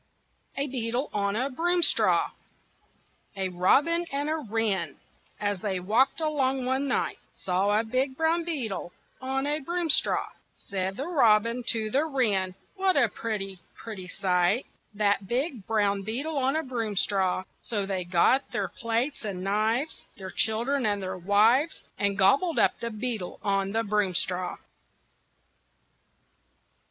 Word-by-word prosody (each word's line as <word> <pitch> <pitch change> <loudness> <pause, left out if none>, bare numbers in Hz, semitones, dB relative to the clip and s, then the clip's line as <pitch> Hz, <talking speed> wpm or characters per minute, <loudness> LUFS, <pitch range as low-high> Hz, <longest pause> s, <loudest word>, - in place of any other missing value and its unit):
A 275 - +1
BEETLE 250 0 -2
ON 200 0 0
A 260 +5 -1
BROOMSTRAW 345 +5 +3 1.0
A 190 -1 -2
robin 280 - +3
and 285 +2 -1
a 320 - 0
wren, 210 - -1 0.4
as 205 -2 -1
they 190 -2 -2
walked 220 - +2
along 270 -5 0
one 265 +2 0
night, 255 - -1
Saw 195 +3 +1
a - - 0
big 260 +4 -1
brown 325 +1 +2
beetle 235 - -4 0.3
on 265 +1 -1
a 295 +1 0
broomstraw. 335 +1 +1 0.3
Said 190 0 -4
the 275 - -3
robin 235 -6 +3
to 220 -2 +1
the 280 +6 +2
wren: 205 -11 0 0.2
"What 380 -3 +2
a 240 -5 +4
pretty, 195 -4 -4 0.2
pretty 200 -5 -8
sight 180 +5 +1 0.3
That 205 -1 +1
big 250 - -2
brown 205 -2 +1
beetle 260 +10 -3
on 270 +1 +1
a 320 - 0
broomstraw!" 205 -7 0 0.2
So 205 -4 -2
they 190 -2 -2
got 180 +10 +2
their - - -2
plates 230 +5 -2
and 190 -4 -4
knives, 220 +9 0
Their 190 -1 -7
children 240 +5 +1
and 205 -2 +1
their 185 - -3
wives, 220 - +3 0.2
And 200 -1 0
gobbled 275 - +3
up - - +3
the 235 - -3
beetle 220 -4 -4
on 195 -1 0
the 225 +1 +1
broomstraw. 185 -3 0
225 Hz, 140 wpm, -27 LUFS, 195-270 Hz, 1.0 s, a